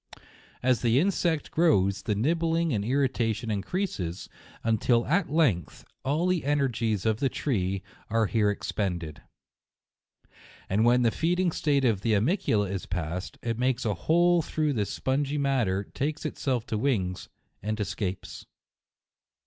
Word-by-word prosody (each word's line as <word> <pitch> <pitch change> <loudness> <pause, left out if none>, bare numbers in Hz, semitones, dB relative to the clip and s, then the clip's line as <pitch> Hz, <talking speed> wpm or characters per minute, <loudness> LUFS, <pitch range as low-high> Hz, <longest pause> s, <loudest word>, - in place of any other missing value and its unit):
As 125 -3 +2
the 120 0 +3
insect 170 -2 +1
grows, 100 - +3
the 105 - -1
nibbling 165 +6 +1
and 100 -3 0
irrita 125 -2 +1
tion 115 0 -4
increases, 100 - -3 0.3
until 115 +1 +2
at 170 +5 +1
length 135 - +1 0.2
all 150 +6 0
the 180 -3 +1
energies 120 -8 0
of 110 -1 +1
the 135 - +1
tree 100 -10 -1 0.3
are 115 0 +2
here 105 -1 +2
expended. 85 -7 -3 1.5
And 105 +4 +2
when 125 +1 +4
the 115 - +3
feeding 175 +4 +1
state 140 -4 +1
of 110 -6 +2
the 110 +1 +1
animalcula 105 - +1
is 95 -2 -4
past, 90 +1 -4
it 115 -1 -2
makes 125 0 0
a 105 - +1
hole 175 - +3
through 155 -1 -1
this 105 -5 -1
spongy 140 +2 -1
matter, 125 -9 +1
takes 145 +9 -3
to 155 - -1
itself 125 -6 -2
wings, 105 -6 -1 0.3
and 110 +2 -3
escapes. 95 -2 -4
120 Hz, 140 wpm, -27 LUFS, 100-145 Hz, 1.5 s, when